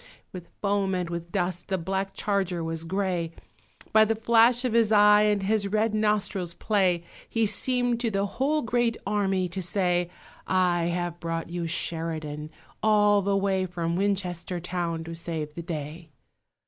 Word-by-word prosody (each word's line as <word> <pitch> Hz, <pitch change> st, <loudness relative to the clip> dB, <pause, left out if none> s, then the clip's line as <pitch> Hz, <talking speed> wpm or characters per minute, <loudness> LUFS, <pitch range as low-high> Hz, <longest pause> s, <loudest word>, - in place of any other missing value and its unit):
With 180 Hz, -2 st, -8 dB, 0.2 s
foam 200 Hz, -1 st, +1 dB
and 180 Hz, -2 st, -3 dB
with 170 Hz, 0 st, -5 dB
dust 180 Hz, -2 st, -2 dB
the 190 Hz, -, 0 dB
black 190 Hz, +3 st, -3 dB
charger 190 Hz, -4 st, -1 dB
was 165 Hz, 0 st, -3 dB
grey; 180 Hz, -2 st, -1 dB, 0.6 s
By 220 Hz, 0 st, +7 dB
the 225 Hz, +1 st, +1 dB
flash 230 Hz, +2 st, +4 dB
of 245 Hz, -, 0 dB
his 230 Hz, -2 st, +3 dB
eye 210 Hz, 0 st, +6 dB
and 210 Hz, -2 st, +2 dB
his 205 Hz, 0 st, +1 dB
red 215 Hz, +2 st, +1 dB
nostril's 205 Hz, -4 st, 0 dB
play 185 Hz, -5 st, +1 dB, 0.3 s
He 225 Hz, -1 st, +1 dB
seemed 245 Hz, +3 st, +2 dB
to 235 Hz, -1 st, 0 dB
the 200 Hz, -1 st, 0 dB
whole 285 Hz, +8 st, 0 dB
great 240 Hz, -1 st, +1 dB
army 195 Hz, -2 st, 0 dB
to 190 Hz, +2 st, -4 dB
say 180 Hz, -1 st, +1 dB, 0.4 s
"I 180 Hz, -2 st, +2 dB
have 175 Hz, 0 st, -2 dB
brought 165 Hz, 0 st, -4 dB
you 175 Hz, -1 st, -3 dB
Sheridan, 160 Hz, -3 st, -3 dB, 0.3 s
all 210 Hz, -1 st, +4 dB
the 200 Hz, 0 st, +1 dB
way 190 Hz, -1 st, 0 dB
From 170 Hz, -1 st, -2 dB
Winchester 185 Hz, -2 st, -1 dB
town 170 Hz, -2 st, -3 dB
to 165 Hz, +1 st, -7 dB
save 160 Hz, -2 st, -5 dB
the 170 Hz, -, -6 dB
day!" 160 Hz, 0 st, -6 dB
190 Hz, 160 wpm, -26 LUFS, 170-210 Hz, 0.6 s, By